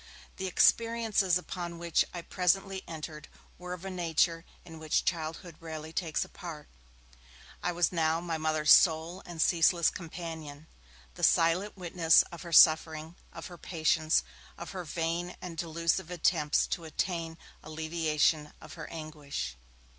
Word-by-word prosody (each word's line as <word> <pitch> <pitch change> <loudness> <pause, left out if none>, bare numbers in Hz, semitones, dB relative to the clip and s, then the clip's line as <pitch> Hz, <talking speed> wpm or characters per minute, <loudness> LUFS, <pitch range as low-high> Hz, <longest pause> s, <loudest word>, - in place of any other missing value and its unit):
The 190 - -3
experiences 220 -2 +3
upon 175 -1 -6
which 170 -1 +2
I 175 -1 -7
presently 190 +2 0
entered 155 -1 -7 0.3
were 180 0 -6
of 180 +1 -8
a 195 - -4
nature 165 -1 0 0.2
in 165 -2 -11
which 155 -1 0
childhood 165 0 -3
rarely 160 -1 -7
takes 165 -4 -1
a - - -17
part. 165 -5 -9 0.9
I 180 - 0
was 175 -1 +1
now 160 -2 +1
my 170 -2 -3
Mother's 155 -1 +2
sole 165 +2 +5
and 170 -2 -8
ceaseless 170 +1 +4
companion; 160 -3 -8 0.5
the - - -10
silent 175 +5 +3
witness 170 -2 +4
of 170 -2 -9
her 170 - -8
suffering, 160 0 +5 0.2
of - - -9
her 175 -2 -10
patience, 160 -1 +1 0.3
of 170 -1 -7
her 185 -2 -6
vain 170 +2 -2
and 175 -2 -7
delusive 165 +1 -1
attempts 155 -4 +1
to 170 - -4
obtain 165 0 -3 0.2
alleviation 155 -1 0
of - - -12
her - - -8
anguish. 150 - -6
165 Hz, 145 wpm, -30 LUFS, 160-175 Hz, 0.9 s, sole